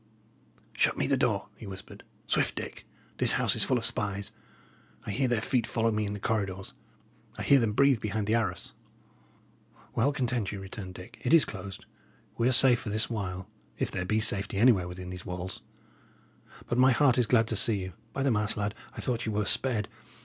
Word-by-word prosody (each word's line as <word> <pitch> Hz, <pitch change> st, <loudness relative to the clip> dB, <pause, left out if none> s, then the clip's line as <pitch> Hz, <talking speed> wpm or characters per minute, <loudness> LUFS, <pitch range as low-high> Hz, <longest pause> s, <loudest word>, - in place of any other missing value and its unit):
"Shut -, -, +2 dB
me -, -, 0 dB
the -, -, +2 dB
door," -, -, 0 dB
he 110 Hz, -, -10 dB
whispered. 95 Hz, -1 st, -10 dB, 0.2 s
"Swift, -, -, 0 dB
Dick! -, -, -7 dB, 0.3 s
This -, -, +5 dB
house -, -, +1 dB
is -, -, +3 dB
full -, -, +1 dB
of -, -, 0 dB
spies; 100 Hz, -1 st, -1 dB, 0.7 s
I -, -, -3 dB
hear 130 Hz, +6 st, 0 dB
their 120 Hz, -3 st, 0 dB
feet 120 Hz, -1 st, 0 dB
follow 115 Hz, -1 st, +1 dB
me 105 Hz, -1 st, -1 dB
in 100 Hz, -, -4 dB
the 105 Hz, -, -6 dB
corridors; 100 Hz, -3 st, -2 dB, 0.6 s
I -, -, -4 dB
hear 140 Hz, -, +5 dB
them 115 Hz, -3 st, 0 dB
breathe 140 Hz, 0 st, +4 dB
behind 105 Hz, 0 st, -2 dB
the 110 Hz, -, 0 dB
arras." 115 Hz, -1 st, -1 dB, 1.2 s
"Well, 135 Hz, +6 st, +2 dB
content 125 Hz, -7 st, -1 dB
you," 100 Hz, -, -6 dB
returned 95 Hz, -1 st, -8 dB
Dick, 110 Hz, +6 st, -11 dB
"it 165 Hz, -, +5 dB
is 160 Hz, -, +6 dB
closed. 100 Hz, -1 st, -8 dB, 0.5 s
We 115 Hz, +1 st, +1 dB
are -, -, +3 dB
safe 125 Hz, -1 st, +7 dB
for 110 Hz, -, -6 dB
this 110 Hz, +3 st, 0 dB
while, 95 Hz, -4 st, -4 dB, 0.3 s
if -, -, -2 dB
there 90 Hz, -, -2 dB
be 110 Hz, +4 st, 0 dB
safety 100 Hz, -3 st, 0 dB
anywhere 105 Hz, -5 st, +4 dB
within 90 Hz, 0 st, -7 dB
these 90 Hz, 0 st, -7 dB
walls. 90 Hz, +1 st, -6 dB, 1.0 s
But 120 Hz, -, -1 dB
my 130 Hz, 0 st, +6 dB
heart 130 Hz, -1 st, +3 dB
is 120 Hz, -, +3 dB
glad 115 Hz, -1 st, +4 dB
to 110 Hz, -, -1 dB
see 110 Hz, +2 st, +3 dB
you. 95 Hz, -2 st, -5 dB, 0.2 s
By 135 Hz, -, -2 dB
the 135 Hz, -, +2 dB
mass, 105 Hz, -1 st, 0 dB
lad, 105 Hz, 0 st, -1 dB, 0.2 s
I -, -, -4 dB
thought 120 Hz, -2 st, -2 dB
ye -, -, -1 dB
were 105 Hz, 0 st, 0 dB
sped! 115 Hz, -4 st, +1 dB
110 Hz, 205 wpm, -29 LUFS, 100-120 Hz, 1.2 s, safe